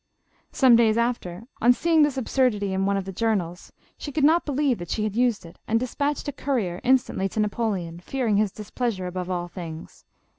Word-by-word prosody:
Some 255 -3 +5
days 225 -1 +4
after, 230 -6 -2 0.2
on 245 +2 +6
seeing 325 +4 +2
this 295 -2 +2
absurdity 230 -6 +1
in 190 +1 0
one 200 0 +1
of 195 - -3
the 195 - -5
journals, 185 -4 -2 0.3
she 290 - -6
could 295 +1 -1
not 320 +3 +4
believe 280 -5 +1
that 175 -1 -7
she 215 - -1
had 215 -1 -2
used 240 -5 +1
it, 165 +2 -14
and 225 +1 +2
despatched 285 +5 -2
a - - -1
courier 245 -11 -2
instantly 250 -6 +2
to 215 - -4
Napoleon, 205 -6 -2
fear 260 +8 -3
ing 210 -3 +2
his 210 -2 +1
displeasure 210 -2 -3
above 180 0 -4
all 175 -1 -2
things. 165 -3 -9
220 Hz, 200 wpm, -24 LUFS, 185-255 Hz, 0.3 s, on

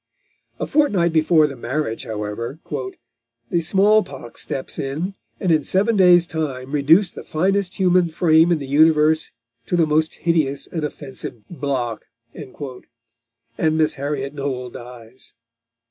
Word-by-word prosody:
A - - -1
fortnight 205 - +2
before 155 0 +4
the 140 -2 -4
marriage, 120 -1 -3
however, 110 +5 -5 0.9
"the 170 - +2
small 200 +5 +4
pox 130 - -8
steps 135 - -5
in, 155 +8 -3 0.3
and 185 - 0
in 155 -2 +3
seven 210 +8 +1
days' 180 -3 +6
time 140 -6 -4
reduced 160 +6 +4
the - - -8
finest 190 +3 0
human 180 -2 +3
frame 160 +1 +4
in 170 - +3
the 140 - -6
universe 155 +2 +3 0.4
to - - 0
the 165 - +4
most 155 +1 +1
hideous 150 -5 0
and 160 -3 -5
offensive 135 -6 -7
block," 130 -8 -3 0.3
and 115 0 -6
Miss 155 -1 +2
Harriot 140 -1 -4
Noel 130 -3 -4
dies. 120 0 -12
150 Hz, 135 wpm, -21 LUFS, 130-170 Hz, 0.9 s, days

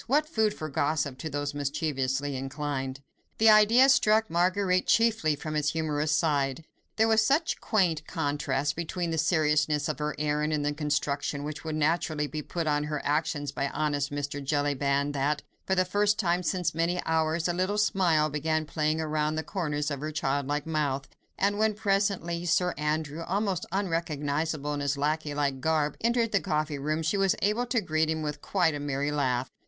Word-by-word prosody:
What 295 +5 +3
food 220 -8 +1
for 155 - -5
gossip 140 -2 -1
to 160 - -4
those 145 0 -3
mischievously 140 -1 -1
inclined. 135 0 -4 0.4
The 220 0 +6
idea 220 +5 +6
struck 220 -5 +4
Marguerite 185 +2 +2
chiefly 225 -10 +3
from 155 +1 -5
its 150 -1 +1
humorous 155 -2 -1
side: 150 -2 +1 0.3
there 220 0 +3
was 220 -1 +4
such 300 +8 +1
quaint 170 -8 +1
contrast 145 -3 -1
between 170 +1 -3
the 160 - 0
seriousness 150 -2 +2
of 155 -1 -3
her 150 0 -2
errand, 150 +1 0
and 145 -1 0
the 145 - 0
construction 145 -1 -1
which 150 0 -6
would 160 -1 -3
naturally 155 -1 0
be 155 +1 -5
put 165 +2 -4
on 150 -1 +1
her 150 -1 -3
actions 145 -1 0
by 140 0 -2
honest 145 -2 -1
Mr. 145 0 -4
Jellyband, 140 0 0
that, 145 +1 0 0.2
for 190 - +2
the 185 0 +3
first 205 +3 +2
time 175 -3 +1
since 180 -1 -1
many 170 +2 0
hours, 160 +1 +1
a 175 - 0
little 185 +4 0
smile 175 -7 +3
began 155 +1 -1
playing 155 0 0
round 155 0 -1
the 160 - -1
corners 150 -6 -2
of 140 - -3
her 155 +2 -4
childlike 145 0 -1
mouth, 145 -4 -1 0.3
and 205 +1 +1
when, 220 -1 +2
presently, 195 -5 0
Sir 180 +1 +2
Andrew, 150 +1 -2
almost 190 +1 -1
unrecognisable 155 -5 -1
in 145 - -3
his 140 0 -1
lacquey 150 +1 -1
like 140 -2 -1
garb, 155 -1 +1
entered 235 0 +1
the 200 - +3
coffee 150 -1 -1
room, 155 +3 -1
she 165 +6 0
was 195 -2 +2
able 215 +5 +1
to 235 -1 +1
greet 155 -3 0
him 160 -1 -1
with 150 -1 -4
quite 175 -5 +1
a 145 - -4
merry 145 0 -2
laugh. 130 -3 0
155 Hz, 180 wpm, -28 LUFS, 145-180 Hz, 0.4 s, The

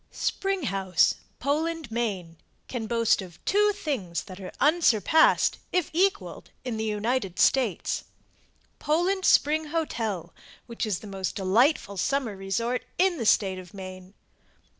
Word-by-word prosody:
] - - -41
SPRING 390 -3 -1
HOUSE 195 -6 +2 0.2
POLAND, 310 0 -2
MAINE 195 -8 -3 0.3
Can 230 -4 -4
boast 230 -2 +2
of 175 -3 -11
two 415 +2 +3
things 265 - -3
that 185 -1 -11
are 185 - -7
unsurpassed, 310 - +4
if 360 -3 0
equalled, 390 +4 0 0.2
in 240 -3 -3
the 220 - -2
United 210 -2 -1
States. 240 -6 +1 0.7
Poland 355 +6 +1
Spring 310 +2 +4
Hotel, 225 - -3 0.3
which 235 -1 -4
is 200 -5 -2
the - - -10
most 195 -2 -4
delightful 200 +2 +2
summer 260 0 -1
resort 230 +6 -2
in 365 -2 +2
the 230 - -1
State 190 -3 +3
of 180 +1 -12
Maine. 185 0 -9
230 Hz, 140 wpm, -26 LUFS, 195-310 Hz, 0.7 s, unsurpassed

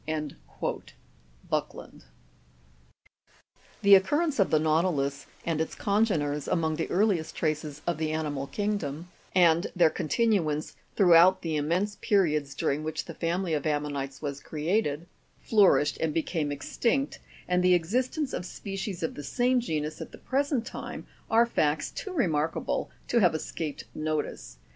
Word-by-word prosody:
Buckland. - - -4 1.8
The 200 0 +7
occurrence 290 - +4
of 195 - +4
the 155 - +4
nautilus 155 -3 0 0.2
and 160 -2 0
its 160 - -3
congeners 165 -9 0
among 160 -3 0
the 165 - -2
earliest 185 -4 +1
traces 155 -2 -2
of 170 -2 -1
the 160 -1 0
animal 150 -3 -2
kingdom, 180 -6 -3 0.3
and 170 -1 +5
their 170 -3 +5
continuance 155 -4 0 0.2
throughout 185 0 +6
the 160 -2 -1
im 150 0 -1
mense 200 +5 0
periods 150 -9 +1
during 145 +2 -1
which 155 0 -3
the - - -8
family 170 +1 -1
of 150 0 -1
ammonites 145 -2 -2
was 140 -1 -3
created, 155 +1 -1 0.3
flour 210 -4 +5
ished, 150 - -1
and 160 -2 0
became 160 -2 -1
extinct, 235 - -1 0.3
and 180 0 +2
the 180 0 +6
existence 255 - -1
of - - -3
species 195 -1 -5
of 160 - -1
the - - -7
same 250 - +2
genus 155 -9 -3
at - - -7
the - - -11
present 275 -3 -1
time, - - -7 0.2
are 230 +1 +5
facts 155 -9 0
too 395 - -6
remarkable 165 - 0 0.2
to 240 - +3
have 180 -6 +4
escaped 155 -1 -4
notice. 155 - -3
165 Hz, 145 wpm, -28 LUFS, 150-200 Hz, 1.8 s, The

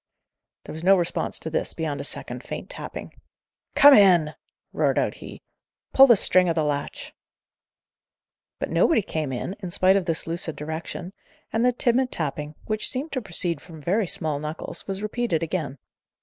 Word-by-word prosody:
There - - -8
was 160 +1 -8
no 195 +2 +6
response 175 -1 -2
to 160 - -4
this, - - 0
beyond 150 -4 -3
a - - -5
second - - -3
faint - - -7
tapping. - - -7 0.6
"Come 285 0 +9
in!" 175 - +5 0.4
roared - - +1
out - - +1
he. - - -11 0.5
"Pull 270 +1 +8
the 235 - +7
string 185 -2 +4
o' - - +2
the 160 -1 0
latch." 145 -1 -4 1.4
But - - -4
nobody 315 -11 +3
came 155 -6 -3
in, 130 +9 -4
in 185 -3 -6
spite 185 +2 +3
of 195 -3 +1
this 165 -2 -1
lucid 165 -1 -4
direction; 160 +4 -6 0.4
and 225 +1 +1
the 250 - +4
timid 250 +1 +1
tapping, 150 -1 -4
which 215 -1 0
seemed 275 +5 -3
to 260 - -2
proceed 175 -6 0
from 165 -2 -12
very 190 +7 0
small 160 -6 -2
knuckles, 155 +2 -7
was 195 +1 -4
repeated 215 -6 -1
again. 155 -5 -3
175 Hz, 175 wpm, -24 LUFS, 155-205 Hz, 1.4 s, Come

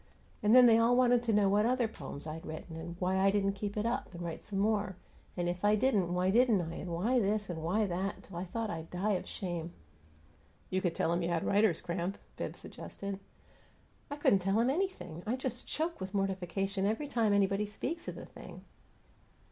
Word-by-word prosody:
And 215 +1 +5
then 250 -1 +10
they 230 -1 +7
all 235 +2 +4
wanted 245 -1 +5
to 235 -2 0
know 210 -2 +4
what 205 +3 +3
other 250 -1 +2
poems 145 -9 -8
I'd 160 +1 -6
written 160 +1 -7
and 165 +1 -6
why 185 +1 +1
I 195 +1 +5
didn't 195 0 +2
keep 205 +1 -4
it 210 - 0
up 235 - -1
and 175 - -6
write 165 -1 -5
some 200 - -5
more, 205 -1 +1 0.4
and 175 0 0
if 175 +2 -3
I 210 +1 +5
didn't, 210 -6 +2
why 180 +1 +2
didn't 235 -2 +5
I, 165 -1 -3
and 185 - -5
why 220 +10 +2
this 205 -2 0
and 160 -2 -5
why 195 +7 +1
that, 190 +2 -3
till 195 - -12
I 180 - -3
thought 225 +4 -3
I'd 165 -1 -6
die 190 +4 0
of 185 - -1
shame!" 175 -3 -4 1.0
"You 185 - +1
could 175 -3 0
tell 165 - +1
'em 175 - 0
you 170 - -1
had 170 -1 0
writer's 200 -4 +3
cramp," 175 +2 -3 0.2
Bibbs - - -5
suggested. 200 -1 -7 0.9
"I 285 - -3
couldn't 245 -9 +4
tell 195 +3 +1
'em 240 +3 +3
anything! 270 - -3
I 235 - +1
just 255 -1 -4
choke 320 - -2
with 190 +2 -5
mortification 195 0 -1
every 225 +8 -1
time 230 -6 +2
anybody 200 +1 +2
speaks 295 +11 -4
of - - -4
the - - -8
thing." - - -12
195 Hz, 215 wpm, -32 LUFS, 180-225 Hz, 1.0 s, then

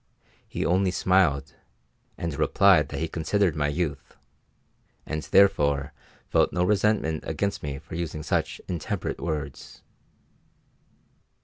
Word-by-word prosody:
He - - -3
only 95 +2 +2
smiled 85 -7 +2 0.6
and 85 -2 -3
replied - - +4
that 70 +1 -5
he 80 - 0
considered 85 +2 0
my 75 -1 0
youth, 75 -4 -3 0.9
and 80 0 -3
therefore 75 -7 +3 0.3
felt - - +2
no 90 - 0
resentment 100 -5 +1
against 100 0 -2
me 70 -2 -4
for - - -12
using 80 -2 -4
such - - -1
intemperate 85 -3 -3
words. 75 -4 -5
80 Hz, 115 wpm, -26 LUFS, 75-90 Hz, 0.9 s, replied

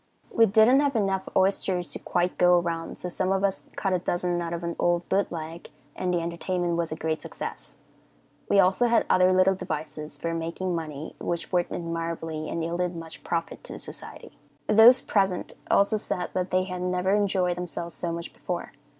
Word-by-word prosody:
We 230 -2 +5
didn't 220 +6 +6
have 285 -2 +1
enough 195 -3 0
oysters 190 -2 +1
to - - -3
quite 175 0 -1
go 180 0 +6
around, 170 -1 -2
so - - -5
some 185 +1 -1
of 195 0 +1
us 195 -1 -1
cut 195 -2 0
a 180 - +2
dozen 175 0 -1
out 170 -1 -3
of 170 0 -4
an 170 0 -3
old 175 0 +1
boot 200 +1 +1
leg, 165 0 -7 0.3
and 180 - -1
the 175 -1 +1
entertainment 170 +1 -1
was 170 -1 -1
a - - -2
great 160 0 -2
success. - - -7 0.7
We 200 - +5
also 190 +6 +4
had 235 - +3
other 185 0 +5
little 185 +1 +4
devices 155 -4 -5
for 165 +3 -3
making 170 +3 -3
money, 155 -2 -5
which 170 -1 -3
worked 175 -2 +1
admirably 165 -2 -4
and 165 - -2
yielded 175 +1 -1
much 165 -1 -9
profit 165 -1 -3
to - - -7
the - - -7
society. - - -9 0.3
Those 235 +4 +7
present 195 -3 0 0.2
also 200 +2 +4
said 180 -4 -3
that 185 0 -1
they 185 0 +2
had 180 -1 -5
never 180 +1 +1
enjoyed 190 -3 +2
themselves 170 -1 -5
so 170 - -3
much 170 +1 -5
before. 175 -1 -5
180 Hz, 195 wpm, -26 LUFS, 170-190 Hz, 0.7 s, Those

